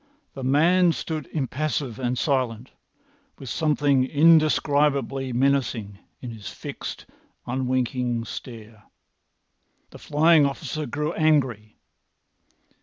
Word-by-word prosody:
The 135 Hz, -, -7 dB
man 165 Hz, +6 st, +4 dB
stood 155 Hz, -2 st, -5 dB
impassive 140 Hz, -3 st, -2 dB
and 125 Hz, 0 st, -1 dB
silent, 125 Hz, -3 st, -1 dB, 0.7 s
with 135 Hz, -4 st, -9 dB
something 145 Hz, -4 st, +2 dB
indescribably 145 Hz, -3 st, +2 dB
menacing 120 Hz, -6 st, 0 dB, 0.2 s
in 125 Hz, -, -6 dB
his 110 Hz, -3 st, -8 dB
fixed, -, -, -7 dB, 0.4 s
unwinking 125 Hz, -2 st, -1 dB
stare. 110 Hz, -2 st, -10 dB, 1.1 s
The -, -, -12 dB
flying 155 Hz, +1 st, +4 dB
officer 145 Hz, +2 st, -3 dB
grew 150 Hz, +3 st, -3 dB
angry. 130 Hz, -9 st, 0 dB
135 Hz, 95 wpm, -24 LUFS, 120-150 Hz, 1.1 s, man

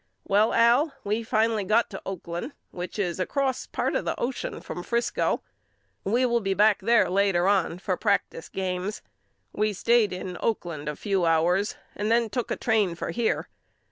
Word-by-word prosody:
Well 210 Hz, +3 st, +3 dB
Al 245 Hz, +6 st, +4 dB
we 210 Hz, +3 st, 0 dB
finally 220 Hz, -1 st, +1 dB
got 220 Hz, +5 st, +2 dB
to 195 Hz, -, -6 dB
Oakland 175 Hz, -, -5 dB, 0.2 s
which 180 Hz, +3 st, -6 dB
is 180 Hz, -4 st, -1 dB
across 265 Hz, +6 st, -1 dB
part -, -, -1 dB
of -, -, 0 dB
the -, -, -3 dB
ocean 250 Hz, +1 st, -3 dB
from 175 Hz, -, -6 dB
Frisco. 235 Hz, +6 st, 0 dB, 0.6 s
We 235 Hz, +6 st, +2 dB
will 235 Hz, -1 st, +2 dB
be 195 Hz, -3 st, -1 dB
back 210 Hz, +1 st, +4 dB
there 230 Hz, +3 st, +4 dB
later 190 Hz, -1 st, +2 dB
on 190 Hz, -4 st, +2 dB
for 185 Hz, 0 st, -1 dB
practice 200 Hz, -6 st, 0 dB
games. 190 Hz, +2 st, -3 dB, 0.5 s
We 215 Hz, 0 st, 0 dB
stayed 230 Hz, +1 st, +3 dB
in 180 Hz, 0 st, -5 dB
Oakland 170 Hz, -9 st, -2 dB
a 150 Hz, -, -4 dB
few 195 Hz, +2 st, 0 dB
hours 175 Hz, +5 st, +2 dB, 0.2 s
and 210 Hz, +1 st, -2 dB
then 230 Hz, -2 st, +2 dB
took 245 Hz, -2 st, -2 dB
a -, -, 0 dB
train 210 Hz, -7 st, +1 dB
for -, -, -4 dB
here. 235 Hz, -1 st, 0 dB
205 Hz, 170 wpm, -26 LUFS, 180-230 Hz, 0.6 s, Al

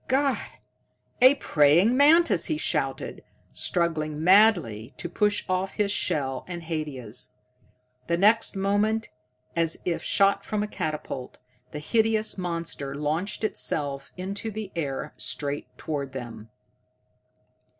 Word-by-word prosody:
"God, 270 Hz, +1 st, +2 dB, 0.8 s
a 260 Hz, +3 st, +8 dB
praying 165 Hz, -, +4 dB
mantis!" 310 Hz, +5 st, +5 dB
he 315 Hz, -, -1 dB
shouted, -, -, -2 dB, 0.3 s
struggling 155 Hz, -3 st, -1 dB
madly 175 Hz, -, +4 dB
to -, -, -5 dB
push 205 Hz, +4 st, 0 dB
off 185 Hz, +1 st, -1 dB
his 205 Hz, -1 st, +1 dB
shell 135 Hz, -9 st, -1 dB
and 175 Hz, -2 st, -6 dB
Haidia's. 145 Hz, -10 st, -4 dB, 0.7 s
The 170 Hz, -, +1 dB
next 215 Hz, +4 st, +4 dB
moment, 205 Hz, +3 st, +1 dB, 0.5 s
as 165 Hz, -1 st, +1 dB
if 170 Hz, -2 st, -1 dB
shot 195 Hz, +2 st, +2 dB
from 210 Hz, -1 st, -2 dB
a -, -, -3 dB
catapult, 155 Hz, -8 st, -5 dB, 0.3 s
the -, -, -6 dB
hideous 220 Hz, +6 st, +1 dB
monster 170 Hz, -6 st, -4 dB
launched 155 Hz, +9 st, -2 dB
itself 145 Hz, -9 st, -2 dB
into 200 Hz, +4 st, -4 dB
the 215 Hz, -2 st, -6 dB
air 140 Hz, -5 st, -3 dB
straight 145 Hz, 0 st, -3 dB
toward 140 Hz, -4 st, -4 dB
them. 115 Hz, -4 st, -8 dB
175 Hz, 120 wpm, -26 LUFS, 150-210 Hz, 0.8 s, a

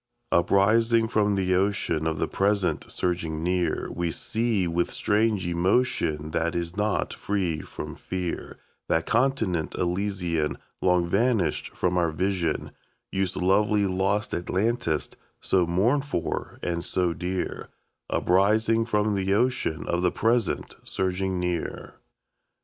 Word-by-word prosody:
Uprising 110 Hz, +6 st, +4 dB
from 105 Hz, -2 st, +2 dB
the 95 Hz, -1 st, +1 dB
ocean 95 Hz, -4 st, +1 dB
of 80 Hz, -1 st, -1 dB
the -, -, 0 dB
present 95 Hz, -5 st, 0 dB
surging 80 Hz, -3 st, -2 dB
near, 90 Hz, 0 st, 0 dB
We 85 Hz, 0 st, -1 dB
see, 110 Hz, +1 st, 0 dB
with 85 Hz, +1 st, 0 dB
strange 105 Hz, -2 st, +1 dB
emotion, 85 Hz, -4 st, +1 dB
that 85 Hz, +1 st, 0 dB
is 85 Hz, 0 st, -3 dB
not 105 Hz, 0 st, 0 dB
free 95 Hz, -6 st, -1 dB
from -, -, -7 dB
fear, 90 Hz, -2 st, -5 dB, 0.3 s
That 80 Hz, 0 st, +1 dB
continent 115 Hz, -, +1 dB
Elysian 90 Hz, -4 st, -1 dB, 0.2 s
Long 90 Hz, -1 st, +3 dB
vanished 100 Hz, -4 st, +1 dB
from 90 Hz, 0 st, +1 dB
our 85 Hz, -1 st, +2 dB
vision, 85 Hz, 0 st, -1 dB, 0.4 s
Youth's 95 Hz, -1 st, -1 dB
lovely 100 Hz, +2 st, +3 dB
lost 100 Hz, +4 st, 0 dB
Atlantis, 95 Hz, -2 st, 0 dB, 0.3 s
so 90 Hz, -3 st, +2 dB
mourned 115 Hz, +12 st, +2 dB
for 85 Hz, -, -3 dB
and 85 Hz, -1 st, -1 dB
so 90 Hz, -2 st, 0 dB
dear, 90 Hz, +2 st, -3 dB, 0.4 s
Uprising 110 Hz, +5 st, +3 dB
from 105 Hz, -2 st, +1 dB
the 95 Hz, 0 st, +1 dB
ocean 120 Hz, -9 st, 0 dB
of 85 Hz, -, 0 dB
the 90 Hz, -, +2 dB
present 115 Hz, -2 st, 0 dB
surging 95 Hz, 0 st, -1 dB
near. 90 Hz, -2 st, -3 dB
95 Hz, 125 wpm, -26 LUFS, 85-105 Hz, 0.4 s, Uprising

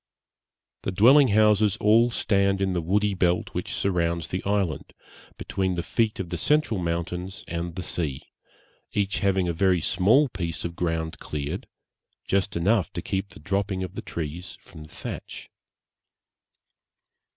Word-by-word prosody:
The -, -, -2 dB
dwelling 130 Hz, +9 st, +6 dB
houses 105 Hz, -1 st, +4 dB
all 115 Hz, +3 st, +4 dB
stand 100 Hz, -4 st, +1 dB
in 95 Hz, -1 st, 0 dB
the 85 Hz, -, 0 dB
woody 100 Hz, +5 st, +1 dB
belt 90 Hz, -1 st, +1 dB
which -, -, -3 dB
surrounds 85 Hz, -3 st, 0 dB
the 90 Hz, -, -3 dB
island, 100 Hz, -7 st, -1 dB, 0.4 s
between 95 Hz, -1 st, -2 dB
the 85 Hz, -, -2 dB
feet 110 Hz, +2 st, 0 dB
of 90 Hz, -3 st, -4 dB
the 85 Hz, -, -3 dB
central 150 Hz, -, +2 dB
mountains 90 Hz, +2 st, -3 dB
and 85 Hz, 0 st, -4 dB
the 90 Hz, -, -4 dB
sea, 75 Hz, -8 st, -3 dB, 0.7 s
each 100 Hz, -1 st, 0 dB
having 95 Hz, -2 st, +1 dB
a 85 Hz, -, 0 dB
very 90 Hz, +1 st, +3 dB
small 105 Hz, -, +4 dB
piece 85 Hz, -8 st, -4 dB
of 85 Hz, 0 st, -4 dB
ground 80 Hz, -2 st, -2 dB
cleared, 70 Hz, -2 st, -4 dB, 0.6 s
just 100 Hz, 0 st, 0 dB
enough 95 Hz, +1 st, +2 dB
to -, -, -4 dB
keep 95 Hz, +1 st, -2 dB
the -, -, -14 dB
dropping 95 Hz, +3 st, -1 dB
of 90 Hz, 0 st, -6 dB
the -, -, -5 dB
trees 85 Hz, +2 st, -6 dB
from 75 Hz, -, -13 dB
the -, -, -16 dB
thatch. -, -, -8 dB
95 Hz, 150 wpm, -25 LUFS, 85-100 Hz, 0.7 s, dwelling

